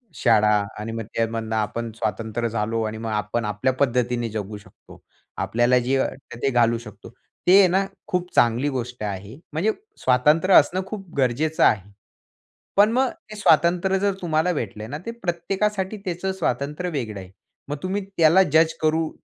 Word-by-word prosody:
शाळा. 110 Hz, -3 st, +4 dB, 0.3 s
आणि 110 Hz, +2 st, -5 dB
मग 115 Hz, 0 st, -4 dB
त्यामधनं 115 Hz, -1 st, -1 dB
आपण 110 Hz, +2 st, -2 dB
स्वातंत्र 110 Hz, +2 st, -2 dB
झालो. 115 Hz, 0 st, -1 dB
आणि 110 Hz, 0 st, -4 dB
मग 115 Hz, 0 st, -5 dB
आपण 105 Hz, +2 st, -2 dB
आपल्या 105 Hz, +5 st, 0 dB
पद्धतीने 120 Hz, -3 st, +1 dB
जगू 105 Hz, -1 st, -5 dB
शकतो. 100 Hz, -, -17 dB, 0.4 s
आपल्याला 120 Hz, +2 st, +2 dB
जे 135 Hz, +2 st, +2 dB
वाटतं 130 Hz, -3 st, -4 dB
ते 135 Hz, -, +3 dB
घालू 120 Hz, -2 st, +3 dB
शकतो. 105 Hz, -2 st, -12 dB, 0.4 s
ते 185 Hz, +2 st, +8 dB
आहे 195 Hz, -, +7 dB
ना 190 Hz, +2 st, +1 dB, 0.2 s
खूप 180 Hz, -3 st, -2 dB
चांगली 120 Hz, +5 st, +3 dB
गोष्ट 125 Hz, -1 st, -5 dB
आहे. 100 Hz, +2 st, -5 dB, 0.2 s
म्हणजे 180 Hz, +8 st, +1 dB, 0.3 s
स्वातंत्र्य 150 Hz, +9 st, +4 dB
असणं 180 Hz, +6 st, +5 dB
खूप 195 Hz, -3 st, -7 dB
गरजेचं 140 Hz, +5 st, +1 dB
आहे. 100 Hz, -1 st, +2 dB, 0.9 s
पण 205 Hz, +2 st, +6 dB
मग 255 Hz, +2 st, +2 dB, 0.2 s
ते 215 Hz, -, -8 dB
स्वातंत्र्य 180 Hz, +1 st, +3 dB
जर 200 Hz, 0 st, +1 dB
तुम्हाला 165 Hz, 0 st, +1 dB
भेटलंय 110 Hz, -, -5 dB
ना 145 Hz, -, -5 dB
ते 230 Hz, -, -3 dB
प्रत्येकासाठी 190 Hz, +3 st, -1 dB
त्याचं 180 Hz, +1 st, -2 dB
स्वातंत्र्य 160 Hz, -1 st, -2 dB
वेगळं 115 Hz, -9 st, -4 dB
आहे. 95 Hz, -1 st, -11 dB, 0.4 s
मग 145 Hz, -, -3 dB
तुम्ही 195 Hz, +2 st, -2 dB
त्याला 165 Hz, +4 st, +6 dB
जज् 160 Hz, 0 st, +5 dB
करू 160 Hz, 0 st, +1 dB
130 Hz, 160 wpm, -23 LUFS, 115-180 Hz, 0.9 s, ते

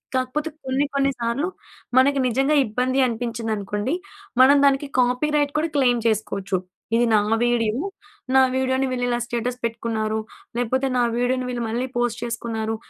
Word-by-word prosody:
కాకపోతే 260 Hz, +5 st, -1 dB, 0.2 s
కొన్ని, 265 Hz, +2 st, +1 dB
కొన్ని 275 Hz, 0 st, +2 dB
సార్లు 235 Hz, +7 st, -1 dB, 0.5 s
మనకి 275 Hz, +2 st, +5 dB
నిజంగా 270 Hz, +5 st, +2 dB
ఇబ్బంది 250 Hz, +4 st, 0 dB
అనిపించిందనుకోండి, 225 Hz, -1 st, -2 dB, 0.5 s
మనం 275 Hz, +2 st, +7 dB
దానికి 275 Hz, +1 st, +3 dB
కాపీరైట్ 285 Hz, +4 st, +1 dB
కూడా 325 Hz, +2 st, -1 dB
క్లెయిమ్ 245 Hz, -3 st, +3 dB
చేసుకోవచ్చు. 200 Hz, -3 st, -1 dB, 0.4 s
ఇది 240 Hz, +1 st, +4 dB
నా 215 Hz, -, +6 dB, 0.2 s
వీడియో. 235 Hz, -2 st, +1 dB, 0.6 s
నా 265 Hz, -, +8 dB
వీడియోని 260 Hz, 0 st, +1 dB
వీళ్ళు 250 Hz, -1 st, -1 dB
ఇలా 240 Hz, -1 st, +1 dB
స్టేటస్ 240 Hz, +1 st, -3 dB
పెట్టుకున్నారు. 225 Hz, -1 st, -1 dB, 0.4 s
లేకపోతే, 255 Hz, +3 st, 0 dB
నా -, -, +3 dB
వీడియోని 250 Hz, +1 st, 0 dB
వీళ్ళు 245 Hz, -1 st, -3 dB
మళ్ళీ 240 Hz, +3 st, -1 dB
పోస్ట్ 240 Hz, -1 st, 0 dB
చేసుకున్నారు. 230 Hz, -2 st, -3 dB
245 Hz, 140 wpm, -23 LUFS, 230-265 Hz, 0.6 s, నా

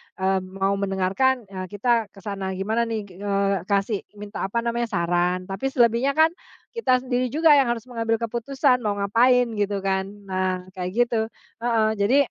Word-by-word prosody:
eee, 190 Hz, 0 st, +1 dB
mau 195 Hz, +1 st, -2 dB
mendengarkan, 200 Hz, +7 st, +1 dB
eee, 185 Hz, -1 st, -5 dB
kita 225 Hz, +2 st, +1 dB
ke 195 Hz, 0 st, -17 dB
sana 195 Hz, -2 st, -4 dB
gimana 220 Hz, +5 st, 0 dB
nih, 220 Hz, -2 st, -3 dB, 0.2 s
eee, 200 Hz, -2 st, 0 dB
kasih 200 Hz, +1 st, +1 dB, 0.2 s
minta 205 Hz, -1 st, -5 dB
apa 235 Hz, +4 st, -2 dB
namanya 235 Hz, 0 st, -1 dB
saran, 175 Hz, -1 st, 0 dB
tapi 195 Hz, +8 st, -3 dB
selebihnya 245 Hz, +1 st, +2 dB
kan, 315 Hz, +1 st, +5 dB, 0.4 s
kita 255 Hz, -, +2 dB
sendiri 250 Hz, 0 st, 0 dB
juga 310 Hz, +3 st, +5 dB
yang 275 Hz, -4 st, +4 dB
harus 235 Hz, 0 st, -2 dB
mengambil 230 Hz, -2 st, -1 dB
keputusan 250 Hz, +3 st, 0 dB
mau 205 Hz, -2 st, -1 dB
ngapain 245 Hz, +5 st, +4 dB
gitu 205 Hz, -1 st, -1 dB
kan, 190 Hz, 0 st, +1 dB, 0.2 s
nah 185 Hz, -1 st, -1 dB
kayak 180 Hz, -1 st, -4 dB, 0.2 s
gitu. 230 Hz, -2 st, -1 dB, 0.4 s
Heeh, 230 Hz, -2 st, +2 dB
jadi, 240 Hz, +8 st, +4 dB
210 Hz, 165 wpm, -24 LUFS, 195-240 Hz, 0.4 s, kan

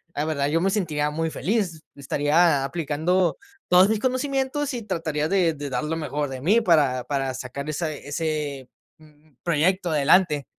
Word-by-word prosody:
la 145 Hz, -, -1 dB
verdad 140 Hz, -3 st, -1 dB
yo 165 Hz, +3 st, +1 dB
me 195 Hz, -, +2 dB
sentiría 150 Hz, -7 st, 0 dB
muy 165 Hz, +1 st, -2 dB
feliz, 180 Hz, -3 st, -2 dB
estaría 145 Hz, +2 st, +2 dB
aplicando 165 Hz, +4 st, 0 dB, 0.3 s
todos 180 Hz, +2 st, +6 dB
mis 220 Hz, -1 st, +1 dB
conocimientos 265 Hz, +2 st, -1 dB
y 240 Hz, -, -4 dB
trataría 160 Hz, -6 st, -2 dB
de 175 Hz, -2 st, +2 dB
de 145 Hz, -1 st, -6 dB
dar 125 Hz, -2 st, -2 dB
lo 155 Hz, +2 st, -2 dB
mejor 150 Hz, -2 st, -3 dB
de 130 Hz, -1 st, -6 dB
mí 210 Hz, -, +3 dB
para 145 Hz, -, +3 dB
para 135 Hz, -1 st, -2 dB
sacar 135 Hz, +4 st, -6 dB
esa 155 Hz, +1 st, -2 dB
ese 145 Hz, -3 st, -4 dB, 0.3 s
mm, 155 Hz, 0 st, -22 dB
proyecto 175 Hz, +2 st, +1 dB
adelante. 150 Hz, 0 st, +3 dB
155 Hz, 165 wpm, -24 LUFS, 145-180 Hz, 0.3 s, todos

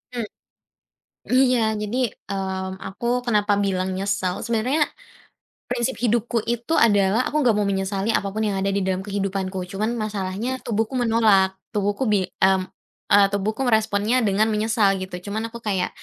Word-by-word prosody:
Mmm, 235 Hz, -3 st, -2 dB, 1.1 s
iya, 255 Hz, -1 st, +4 dB, 0.2 s
jadi, 210 Hz, +3 st, -3 dB, 0.3 s
mmm, 190 Hz, -1 st, -3 dB
aku 195 Hz, +5 st, -6 dB, 0.2 s
kenapa 210 Hz, -3 st, +2 dB
bilang 185 Hz, -1 st, 0 dB
nyesel, 195 Hz, -2 st, -1 dB
sebenarnya 240 Hz, +7 st, +1 dB, 0.9 s
prinsip 240 Hz, +2 st, -1 dB
hidupku 235 Hz, 0 st, +1 dB
itu 240 Hz, +6 st, -1 dB
adalah 205 Hz, 0 st, +4 dB
aku 305 Hz, -, +1 dB
nggak 230 Hz, -, +5 dB
mau 210 Hz, -, +1 dB
menyesali 195 Hz, +1 st, -1 dB
apapun 200 Hz, +2 st, -1 dB
yang 200 Hz, -2 st, -1 dB
ada 195 Hz, -, +1 dB
di 200 Hz, -, 0 dB
dalam 190 Hz, 0 st, -1 dB
kehidupanku, 195 Hz, -2 st, -2 dB
cuman 210 Hz, +2 st, -1 dB
masalahnya 215 Hz, +3 st, -3 dB
tubuhku 225 Hz, +2 st, -1 dB
menolak. 220 Hz, -5 st, +3 dB, 0.2 s
Tubuhku 205 Hz, +2 st, 0 dB
bi 200 Hz, -3 st, +2 dB, 0.2 s
m 190 Hz, 0 st, +4 dB, 0.5 s
e -, -, +6 dB, 0.2 s
tubuhku 205 Hz, +5 st, -1 dB
meresponnya 220 Hz, +1 st, +2 dB
dengan 210 Hz, +2 st, +2 dB
menyesal 210 Hz, -2 st, +2 dB
gitu. 185 Hz, -1 st, -5 dB
Cuman 220 Hz, +2 st, -3 dB
aku -, -, -5 dB
kayak, 195 Hz, -5 st, -1 dB
205 Hz, 145 wpm, -23 LUFS, 195-230 Hz, 1.1 s, e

